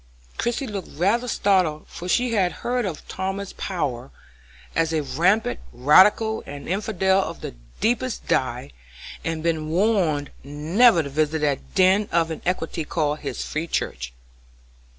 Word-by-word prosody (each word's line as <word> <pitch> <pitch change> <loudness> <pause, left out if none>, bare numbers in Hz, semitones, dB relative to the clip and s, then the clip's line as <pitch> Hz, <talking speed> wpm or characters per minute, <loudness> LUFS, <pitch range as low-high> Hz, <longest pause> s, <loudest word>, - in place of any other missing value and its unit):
Christie 240 +3 -1
looked 205 -6 -6
rather 205 +10 +1
startled, 185 -9 +1
for 180 +1 -8
she 245 +4 +2
had 190 -5 +2
heard 245 -1 0
of 165 -5 -7
Thomas 190 +1 -4
Power 140 -9 -3 0.7
as 165 -1 +1
a 155 -2 0
rampant 170 - +1
radical 200 - +4
and 145 0 -8
infidel 190 0 +1
of - - -6
the - - -5 0.3
deepest 240 +2 0
dye, 125 - -1 0.5
and 165 -1 -3
been 160 -2 -1
warned 170 -6 +1
never 165 - +3
to 140 - -6
visit 155 +2 +1
that 145 +3 -2
den 190 +2 +4
of 165 -1 +2
iniquity 165 0 -2
called 150 -1 -1
his 140 - -4
free 155 +2 -3
church. 60 - -3
170 Hz, 140 wpm, -23 LUFS, 150-200 Hz, 0.7 s, radical